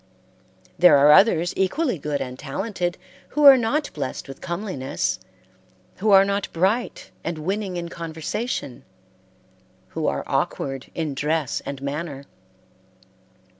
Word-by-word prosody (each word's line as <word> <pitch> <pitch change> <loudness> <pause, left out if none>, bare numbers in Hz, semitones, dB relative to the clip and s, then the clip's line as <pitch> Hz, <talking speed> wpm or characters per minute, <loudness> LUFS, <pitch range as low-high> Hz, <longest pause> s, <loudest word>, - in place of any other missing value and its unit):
There 175 -5 +7
are 145 +2 +6
others 175 -1 +5
equally 205 - 0
good 145 0 -2
and 125 0 -6
talented 175 +4 -3 0.3
who 300 - -1
are 275 -1 +11
not 270 +5 -1
blessed 140 -3 -5
with 135 -1 -10
comeliness, 170 -7 -3 0.8
who 215 +3 0
are 195 -1 +7
not 200 0 -2
bright 195 +8 -1
and 170 -1 -3
winning 190 +3 -3
in 170 0 -4
conversation, 165 - -5 1.1
who 160 -1 -3
are - - -1
awkward 135 -1 -2
in 160 -3 -2
dress 150 0 -1
and 140 -1 -6
manner. 140 -1 -4
170 Hz, 125 wpm, -23 LUFS, 145-200 Hz, 1.1 s, are